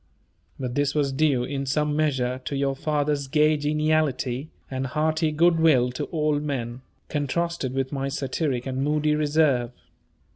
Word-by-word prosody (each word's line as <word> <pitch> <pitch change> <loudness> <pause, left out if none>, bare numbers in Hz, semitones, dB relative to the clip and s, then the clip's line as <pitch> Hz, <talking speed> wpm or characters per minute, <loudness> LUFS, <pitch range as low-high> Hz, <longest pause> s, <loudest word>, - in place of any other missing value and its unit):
But 125 -2 -3
this 145 +2 0
was 145 -2 +1
due, 135 -3 +2
in 140 +1 -3
some 150 +2 0
measure, 130 -4 0
to 140 - -3
your 135 0 0
father's 145 -1 -1
gay 150 +2 +3
geniality, 150 -3 0 0.2
and 130 0 -2
hearty 155 +3 0
good 165 +2 +3
will 130 -7 +4
to 125 - -4
all 150 -2 0
men, 130 -4 -4 0.3
contrasted 150 -1 -2
with 135 -1 -1
my 135 -1 -2
satiric 135 -2 -2
and 130 0 -2
moody 150 +1 +1
reserve. 150 -5 +2
145 Hz, 150 wpm, -25 LUFS, 130-155 Hz, 0.3 s, will